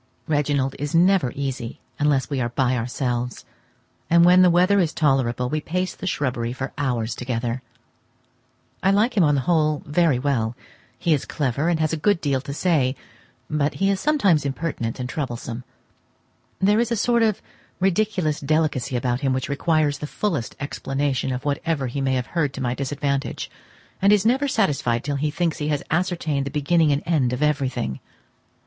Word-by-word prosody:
Reginald 145 -3 0
is 145 +2 -2
never 175 -6 +4
easy 135 -4 -4 0.2
unless 145 -3 +2
we 140 -3 -2
are 120 - 0
by 130 +1 +1
ourselves, 125 0 -2 0.6
and 170 0 +6
when 180 +1 +7
the 180 - +6
weather 180 +4 +4
is 165 -4 +1
tolerable, 130 -5 +1
we 155 +4 -2
pace 180 +4 -2
the 190 - -7
shrubbery 125 -8 -1
for 135 +1 -5
hours 120 -5 -1
together. 120 0 -3 1.2
I 195 - +3
like 215 +5 +2
him 195 - +4
on 145 -2 +3
the 135 - +1
whole 155 -1 +1
very 150 -2 +2
well; 125 -4 0 0.4
he 160 +6 +2
is 145 - -1
clever 140 +3 -1
and 170 -2 +1
has 155 0 +1
a - - 0
good 205 +4 +2
deal 140 -4 0
to 140 - -7
say, 140 -4 +1 0.5
but 150 -1 0
he 195 +1 +2
is 195 - -1
sometimes 205 - +3
impertinent 140 -5 -3
and 125 - -3
troublesome. 125 -3 -4 1.0
There 205 +3 +3
is 235 0 0
a - - +2
sort 235 +3 +2
of 220 -3 +2 0.4
ridiculous 190 -5 +1
delicacy 145 -3 0
about 120 0 0
him 135 -2 +1
which 130 0 -2
requires 145 0 +1
the 150 - -4
fullest 160 - -2
explanation 135 -1 -2
of 130 +3 -4
whatever 145 0 -1
he 130 +3 -3
may 135 -1 +1
have 125 -1 -1
heard 150 -6 0
to 135 - -5
my 120 -1 0
disadvantage, 140 +1 -2 0.5
and 200 +1 +5
is 210 -1 +4
never 265 +5 +3
satisfied 140 - +1
till 145 -1 -2
he 150 +2 0
thinks 165 +2 -1
he 150 - -2
has 145 -2 -1
ascertained 160 -5 0
the - - -2
beginning 150 +2 +2
and 140 +2 0
end 140 -7 +1
of 125 +4 -1
everything. 130 - -1
145 Hz, 180 wpm, -23 LUFS, 130-170 Hz, 1.2 s, when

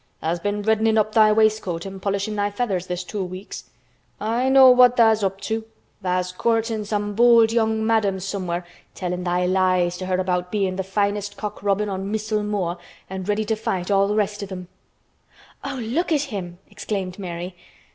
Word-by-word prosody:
Tha's 170 +2 -2
been 205 +3 -2
reddenin' 220 +1 +2
up 215 0 +2
thy 215 -1 +6
waistcoat 215 -5 +1
an' 195 0 -7
polishin' 200 +2 -2
thy 205 0 0
feathers 205 -4 -2
this 180 0 -3
two 200 +2 -4
weeks. 185 +2 -8 0.5
I 235 +5 0
know 265 -1 +8
what 250 0 +6
tha's 220 -3 +4
up 195 0 -1
to. 220 0 -2 0.4
Tha's 180 -1 -1
courtin' 225 +2 0
some 205 0 -2
bold 230 0 +5
young 220 -1 +1
madam 215 -4 +1
somewhere 180 -2 -3 0.3
tellin' 180 -1 -3
thy 180 0 0
lies 185 -1 +2
to 185 - -5
her 185 -1 +1
about 180 -1 -1
bein' 195 -3 0
th' 190 0 -4
finest 205 0 -1
cock 210 -1 -5
robin 200 +1 +1
on 195 0 -4
Missel 215 0 -1
Moor 195 -4 -2 0.3
an' 190 -1 -5
ready 210 +2 0
to 220 - 0
fight 210 -4 -3
all 200 0 +3
th' 210 - 0
rest 210 0 0
of 200 -1 -7
'em." 180 -1 -7 0.9
"Oh! 275 -1 -4
look 280 +10 -1
at 300 -3 +3
him!" 175 -3 -5
exclaimed 190 -3 -5
Mary. 180 -1 -6
205 Hz, 185 wpm, -23 LUFS, 185-220 Hz, 0.9 s, know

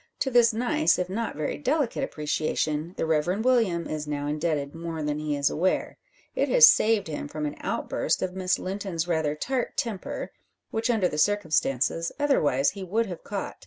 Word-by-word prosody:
To 265 - 0
this 240 -1 +5
nice, 250 +8 +2
if 180 0 -2
not 230 +3 -3
very 155 - -3
delicate 280 -2 0
appreciation, 155 - -2
the - - 0
Reverend 175 +7 0
William 220 -10 +2
is 155 -1 -4
now 145 -1 -3
indebted 150 -1 -1
more 165 -1 -5
than 150 0 -1
he 150 -1 -2
is 140 0 +1
aware. 185 +4 0 0.4
It - - +1
has - - +9
saved 220 - +4
him 150 -2 -4
from 150 +1 -4
an 145 - -3
outburst - - -1
of 185 -1 -2
Miss 185 -1 0
Linton's 185 -3 -3
rather 160 -3 0
tart 250 - -2
temper, 230 -8 -3 0.4
which, 225 +2 -1
under 220 -6 +3
the 150 - -4
circumstances, 165 -4 +1
otherwise 145 - +2
he 200 -1 -7
would 215 +6 0
have 180 -5 -8
caught. 200 -1 -5
180 Hz, 180 wpm, -26 LUFS, 150-225 Hz, 0.4 s, has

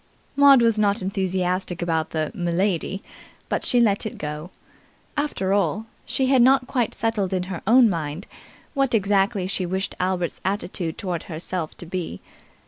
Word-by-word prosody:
Maud 280 -3 +7
was 230 -2 +3
not 205 -1 +2
enthusiastic 185 -1 -1
about 165 -2 -1
the 155 -1 -2
'M'lady', 180 +2 -1 0.5
but - - -1
she 245 - +3
let 210 -4 +3
it 220 - -5
go. 150 +3 -5 0.7
After 285 -10 -1
all, 200 +2 +1 0.2
she 265 - +1
had 260 -1 +4
not 260 +1 +5
quite 245 -3 -1
settled 215 -4 -1
in 185 -1 0
her 170 - -5
own 240 +2 +7
mind 165 -2 -3 0.5
what 275 -4 +2
exactly 200 -1 +2
she 190 0 -1
wished 190 +2 -2
Albert's 180 -2 -1
attitude 185 -4 -2
towards 180 -4 -3
herself 165 0 -5
to - - -5
be. 170 - -4
190 Hz, 155 wpm, -23 LUFS, 175-225 Hz, 0.7 s, Maud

